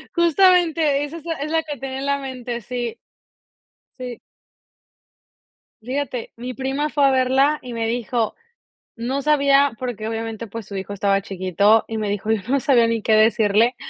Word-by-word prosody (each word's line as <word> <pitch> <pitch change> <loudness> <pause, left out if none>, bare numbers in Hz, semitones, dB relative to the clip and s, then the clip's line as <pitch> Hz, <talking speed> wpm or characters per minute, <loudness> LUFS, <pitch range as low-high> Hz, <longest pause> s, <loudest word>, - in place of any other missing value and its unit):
Justamente, 340 -4 +3
esa 290 +3 -6
es 325 - -13
la 335 - -1
es 300 +1 -5
la 325 0 +1
que 295 -2 -6
tenía 265 +1 -5
en 275 - -4
la 280 0 +1
mente. 250 -3 -5
Sí. 240 0 -5 1.0
Sí. 250 -2 -7 1.6
Fíjate, 255 0 -4
mi 245 +2 -6
prima 270 +3 -2
fue 290 -2 +2
a 275 - +5
verla 265 +3 +3
y 250 - -8
me 230 -1 -2
dijo: 235 -1 -1 0.6
"No 250 +4 -2
sabía", 280 -1 +4
porque 240 -3 -4
obviamente, 225 0 -4
pues, 225 +1 -7
su 200 - -9
hijo 195 +1 -5
estaba 195 0 +1
chiquito, 195 +3 +2
y 225 - -3
me 215 -1 -2
dijo: 205 +2 -2
"Yo 220 -2 +1
no 275 +1 +3
sabía 240 -3 +4
ni 230 -1 -1
qué 220 - +1
decirle, 220 +1 +4
250 Hz, 175 wpm, -21 LUFS, 225-280 Hz, 1.6 s, a